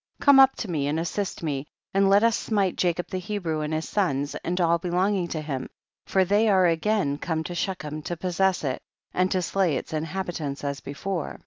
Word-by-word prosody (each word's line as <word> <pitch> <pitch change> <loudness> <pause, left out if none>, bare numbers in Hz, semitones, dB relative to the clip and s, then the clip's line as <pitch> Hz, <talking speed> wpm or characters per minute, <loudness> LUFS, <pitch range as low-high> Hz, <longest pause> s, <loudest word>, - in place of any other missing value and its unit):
Come 280 -1 +7
up 270 0 +7
to 225 - -5
me 150 -6 -1
and 150 +2 0
assist 180 +2 -3
me, 145 -2 -2 0.3
and 195 0 +4
let 200 +2 +5
us 230 -2 +4
smite 200 -4 0
Jacob 175 -1 0
the 185 - -3
Hebrew 180 -5 -3
and 150 0 -3
his 155 +1 -2
sons, 145 -8 0
and 180 +2 -1
all 170 -1 +3
belonging 180 +2 0
to 160 -2 -3
him, 135 -4 -4 0.4
for 190 -1 +3
they 205 +4 +3
are 190 -2 +5
again 165 -3 +1
come 160 -2 -2
to 175 - -5
Shechem 155 -4 -3
to 175 - -3
possess 185 +1 +1
it 130 -3 -2 0.3
and 185 +1 +2
to 185 -2 0
slay 180 -4 +1
its - - -7
inhabi 165 +4 -3
tants 145 -4 -4
as 140 -1 -2
before; 165 +4 -4
9. - - -14
175 Hz, 215 wpm, -25 LUFS, 155-195 Hz, 0.4 s, Come